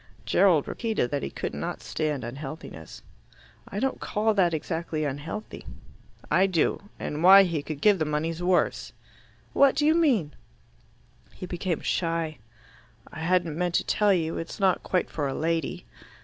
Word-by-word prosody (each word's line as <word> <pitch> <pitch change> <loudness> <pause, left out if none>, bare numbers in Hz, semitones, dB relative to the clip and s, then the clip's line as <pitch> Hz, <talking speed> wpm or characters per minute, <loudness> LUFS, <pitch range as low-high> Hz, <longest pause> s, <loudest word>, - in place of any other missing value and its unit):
Gerald 175 -7 +3
repeated 220 - -2
that 145 - -1
he - - -3
could - - -5
not - - -5
stand 150 -4 -2
unhealthiness. 135 - -8 0.6
"I 200 - -4
don't 265 +3 -1
call 215 +1 0
that 185 -4 +3
exactly 160 0 -3
unhealthy." 145 +9 -6 0.7
"I 190 - +4
do. 190 +3 0
And 150 +1 -4
why 195 +2 +9
he 170 -5 -1
could 145 0 -7
give 205 -3 +4
the 155 - +1
money's 160 +3 -2
worse." 180 0 +1 0.6
"What 275 -1 +5
do 295 0 +1
you 310 - +5
mean?" 255 - +2 1.0
He - - -7
became 175 -1 -3
shy. 165 -2 -1 0.7
"I - - -7
hadn't 170 -1 +1
meant 175 +1 -1
to - - +2
tell 210 -1 +2
you. 165 -3 0
It's 165 - -7
not 190 -2 +2
quite 185 - -1
for 145 -3 -2
a 135 - -3
lady." 165 -1 -2
170 Hz, 160 wpm, -26 LUFS, 155-195 Hz, 1.0 s, why